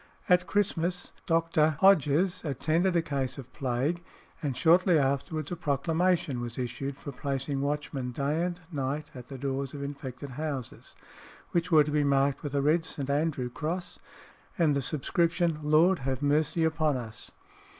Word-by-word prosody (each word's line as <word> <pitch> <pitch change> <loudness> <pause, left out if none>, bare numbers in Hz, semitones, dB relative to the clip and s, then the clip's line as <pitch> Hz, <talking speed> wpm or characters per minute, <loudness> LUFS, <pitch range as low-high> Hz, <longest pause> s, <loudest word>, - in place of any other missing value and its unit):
At 180 0 +4
Christmas 180 -3 0 0.2
Dr. 165 -2 +2
Hodges 180 -1 +4
attended 160 +5 +1
a 170 - +3
case 135 -4 -2
of 130 -2 -10
plague, 140 +7 -1 0.4
and 140 -5 -2
shortly 175 +2 +5
afterwards 140 +3 -1
a - - -1
proclamation 160 -2 0
was 120 -1 -5
issued 130 +2 -4
for 140 - -7
placing 135 +1 -2
watchmen 140 -3 -2
day 145 +6 -1
and 175 0 -3
night 145 0 -3
at 125 -1 -10
the 135 - -8
doors 135 +1 -3
of 140 - -5
infected 140 -1 -6
houses, 140 -3 -5 0.6
which 175 +1 0
were 155 -2 +7
to 150 - -4
be 150 0 +2
marked 140 -1 +2
with 145 -1 -4
a 140 - +1
red 160 +3 +3
St. 140 -4 -4
Andrew 140 -4 0
cross 175 +6 -4 0.6
and 160 -5 +3
the 140 - +1
subscription 165 +3 0
"Lord 155 +5 +4
have 135 +1 -3
mercy 150 +3 +2
upon 155 -3 +1
us!" 115 -3 -8
150 Hz, 160 wpm, -29 LUFS, 135-165 Hz, 0.6 s, were